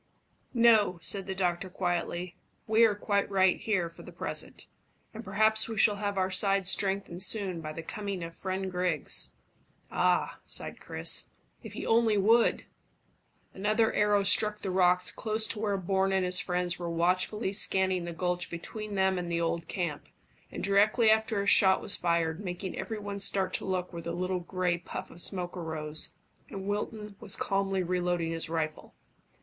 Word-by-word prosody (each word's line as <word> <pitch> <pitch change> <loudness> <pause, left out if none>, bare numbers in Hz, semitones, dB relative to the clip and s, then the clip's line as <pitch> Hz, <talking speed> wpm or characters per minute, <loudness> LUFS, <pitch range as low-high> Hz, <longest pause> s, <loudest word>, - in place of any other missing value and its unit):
"No," 225 -6 +5
said 195 +4 -1
the 190 - -3
doctor 185 0 -1
quietly. 175 -1 -3 0.3
"We 220 +1 +5
are 215 -2 +2
quite 200 -1 -1
right 190 -2 +3
here 195 -6 0
for 165 - -13
the - - -11
present, - - -2 0.5
and 220 +1 -8
perhaps 220 +3 +2
we 225 - -5
shall 205 0 +4
have 200 -1 -3
our 190 0 0
side 195 0 +3
strengthened 195 -2 0
soon 190 -3 +1
by 155 -1 -6
the 165 +1 -7
coming 200 0 -5
of 165 0 -7
friend 190 +1 -4
Griggs." 180 -4 0 0.6
"Ah!" - - +1
sighed - - 0
Chris, - - +1 0.3
"if - - -10
he - - -6
only 225 -2 +3
would!" 225 +4 +3 0.9
Another 215 +3 +1
arrow 205 -1 +2
struck 210 +1 +4
the 190 - -3
rocks 180 -1 +3
close 220 0 0
to 215 - -2
where 205 -2 0
Bourne 190 +1 0
and 190 -1 +1
his 180 0 +3
friends 180 -1 -1
were 170 -1 -4
watchfully 185 +5 0
scanning 190 -3 +2
the 170 - -5
gulch 180 +1 -2
between 210 +5 -6
them 190 -1 +2
and 175 -1 -5
the 170 - 0
old 170 0 -2
camp, 170 -6 -4 0.4
and - - -6
directly 215 +3 +4
after 220 -2 +1
a - - -5
shot 190 -2 +5
was 200 - -5
fired, 170 +1 -1
making 180 0 -5
every 220 - -4
one 205 -1 -6
start 190 -1 +1
to - - -2
look 185 -1 -3
where 170 - -6
the 170 0 -5
little 185 +1 -2
grey 180 -1 -1
puff 175 - -7
of 175 - -7
smoke 180 -2 -1
arose, 155 -3 -3 0.3
and 195 -1 -7
Wilton 210 0 -4
was 215 -4 -1
calmly 195 -1 -1
reloading 175 -2 -1
his 165 -1 -2
rifle. 160 -2 -4
190 Hz, 175 wpm, -29 LUFS, 175-205 Hz, 0.9 s, No